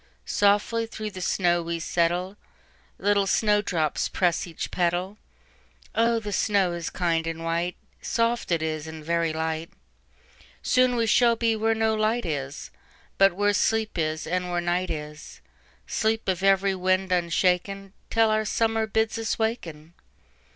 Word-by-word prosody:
"Softly 205 Hz, +3 st, +2 dB
through 215 Hz, -1 st, -6 dB
the 185 Hz, -2 st, -8 dB
snow 175 Hz, -1 st, +1 dB
we 170 Hz, 0 st, -3 dB
settle, 175 Hz, +3 st, 0 dB, 0.6 s
Little 200 Hz, -1 st, +2 dB
snow 210 Hz, +2 st, +3 dB
drops 160 Hz, -7 st, -1 dB
press 175 Hz, -1 st, 0 dB
each 165 Hz, -, -6 dB
petal. 180 Hz, +4 st, -1 dB, 0.7 s
Oh, 230 Hz, +1 st, +2 dB
the 210 Hz, -2 st, -5 dB
snow 195 Hz, -4 st, +2 dB
is 170 Hz, -1 st, -4 dB
kind 165 Hz, -2 st, -1 dB
and 165 Hz, 0 st, -4 dB
white,—Soft 180 Hz, +7 st, -2 dB
it 165 Hz, -2 st, +1 dB
is, 155 Hz, -1 st, -3 dB
and 160 Hz, -1 st, -9 dB
very 170 Hz, 0 st, +1 dB
light; 160 Hz, +1 st, -3 dB, 0.9 s
Soon 255 Hz, -1 st, +3 dB
we 230 Hz, -1 st, +1 dB
shall 235 Hz, +1 st, +4 dB
be 230 Hz, -1 st, +1 dB
where 225 Hz, +1 st, +1 dB
no 220 Hz, 0 st, +1 dB
light 220 Hz, +2 st, 0 dB
is, 145 Hz, -3 st, -4 dB, 0.5 s
But 195 Hz, -1 st, +6 dB
where 205 Hz, +2 st, +1 dB
sleep 220 Hz, +1 st, +1 dB
is, 155 Hz, -1 st, -1 dB
and 180 Hz, +1 st, -2 dB
where 175 Hz, 0 st, 0 dB
night 175 Hz, +1 st, -1 dB
is,—Sleep 160 Hz, +8 st, -5 dB
of 185 Hz, -2 st, 0 dB
every 195 Hz, 0 st, +3 dB
wind 185 Hz, 0 st, 0 dB
unshaken, 180 Hz, +3 st, 0 dB, 0.2 s
Till 225 Hz, -1 st, +3 dB
our 215 Hz, 0 st, +2 dB
Summer 225 Hz, 0 st, 0 dB
bids 220 Hz, +1 st, 0 dB
us 225 Hz, -, -2 dB
waken." 170 Hz, -9 st, -3 dB
185 Hz, 145 wpm, -25 LUFS, 170-220 Hz, 0.9 s, But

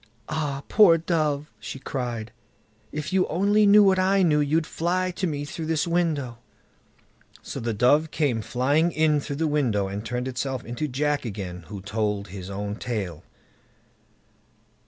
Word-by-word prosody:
"Ah! 145 Hz, -3 st, -2 dB
poor 195 Hz, -6 st, +6 dB
dove", 155 Hz, -3 st, -1 dB
she -, -, -7 dB
cried, 120 Hz, -4 st, -4 dB, 0.6 s
"if 150 Hz, +3 st, -4 dB
you 190 Hz, -1 st, +3 dB
only 205 Hz, +4 st, +3 dB
knew 205 Hz, +1 st, +8 dB
what 190 Hz, -1 st, +4 dB
I 190 Hz, +1 st, +3 dB
know, 150 Hz, -4 st, +3 dB
you'd 155 Hz, +2 st, +1 dB
fly 180 Hz, +4 st, -1 dB
to 180 Hz, +1 st, -2 dB
me 145 Hz, -2 st, -3 dB
through 160 Hz, +2 st, -6 dB
this 160 Hz, -2 st, +1 dB
window." 155 Hz, -9 st, -1 dB, 1.0 s
So -, -, -6 dB
the 115 Hz, 0 st, -2 dB
dove 145 Hz, +8 st, +3 dB
came 140 Hz, -8 st, 0 dB
flying 145 Hz, +9 st, +1 dB
in 155 Hz, -2 st, +2 dB
through 140 Hz, 0 st, -5 dB
the 160 Hz, +3 st, 0 dB
window, 125 Hz, -10 st, +1 dB
and 100 Hz, +2 st, -5 dB
turned 125 Hz, +2 st, -3 dB
itself 130 Hz, -1 st, -3 dB
into 120 Hz, +6 st, -3 dB
Jack 145 Hz, +2 st, 0 dB
again, 95 Hz, -6 st, -6 dB
who 100 Hz, -1 st, -7 dB
told 105 Hz, -1 st, -2 dB
his 95 Hz, 0 st, -8 dB
own 100 Hz, +1 st, -4 dB
tale. 100 Hz, -11 st, -4 dB
145 Hz, 155 wpm, -25 LUFS, 115-160 Hz, 1.0 s, knew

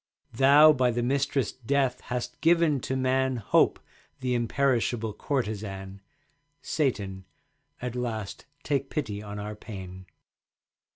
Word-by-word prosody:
Thou 140 Hz, +5 st, +7 dB
by 130 Hz, -3 st, +2 dB
thy 120 Hz, 0 st, -1 dB
mistress 135 Hz, -1 st, 0 dB
Death 130 Hz, +1 st, 0 dB
hast 125 Hz, 0 st, -4 dB
given 165 Hz, -3 st, +4 dB
to 130 Hz, -, -3 dB
man 130 Hz, 0 st, +1 dB
Hope, 115 Hz, -, +2 dB, 0.4 s
the 125 Hz, -1 st, -1 dB
imperishable 120 Hz, -2 st, 0 dB
courtesan. 100 Hz, -6 st, -4 dB, 0.6 s
Satan, 100 Hz, -, -2 dB, 0.6 s
at 125 Hz, -1 st, -3 dB
last 110 Hz, -5 st, -4 dB, 0.2 s
take 140 Hz, -2 st, -1 dB
pity 110 Hz, -9 st, -3 dB
on 105 Hz, 0 st, -7 dB
our 105 Hz, +1 st, -5 dB
pain. 95 Hz, -3 st, -9 dB
125 Hz, 115 wpm, -27 LUFS, 105-135 Hz, 0.6 s, Thou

